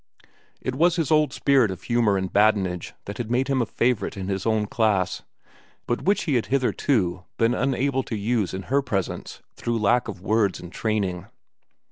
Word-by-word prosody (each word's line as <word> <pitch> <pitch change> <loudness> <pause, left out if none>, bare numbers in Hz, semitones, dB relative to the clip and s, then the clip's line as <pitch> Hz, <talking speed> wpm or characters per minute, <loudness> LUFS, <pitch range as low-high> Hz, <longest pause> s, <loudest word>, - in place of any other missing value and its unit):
It 130 - -2
was 170 +5 +3
his 165 -5 -1
old 155 -1 +4
spirit 135 -6 +3
of 95 - -7
humor 115 -4 +2
and 95 -1 -3
badinage 100 -4 +2
that 100 - -7
had 115 -2 -3
made 130 +3 +1
him 135 -2 +2
a 115 - -1
favorite 120 -4 0
in 95 0 -4
his 95 +1 -2
own 110 -1 +2
class, 105 -4 0 0.6
but 120 - -1
which 200 +2 +1
he 155 - -1
had 120 -3 +1
hitherto 115 -8 0
been 115 +1 +3
unable 135 +1 0
to 115 - -4
use 105 -1 0
in 95 - -5
her 140 +6 +1
presence 100 -9 -4
through 120 -1 -2
lack 115 +3 +2
of 100 -4 -6
words 105 0 +1
and 90 - -10
training. 100 -5 -2
115 Hz, 185 wpm, -24 LUFS, 100-130 Hz, 0.6 s, old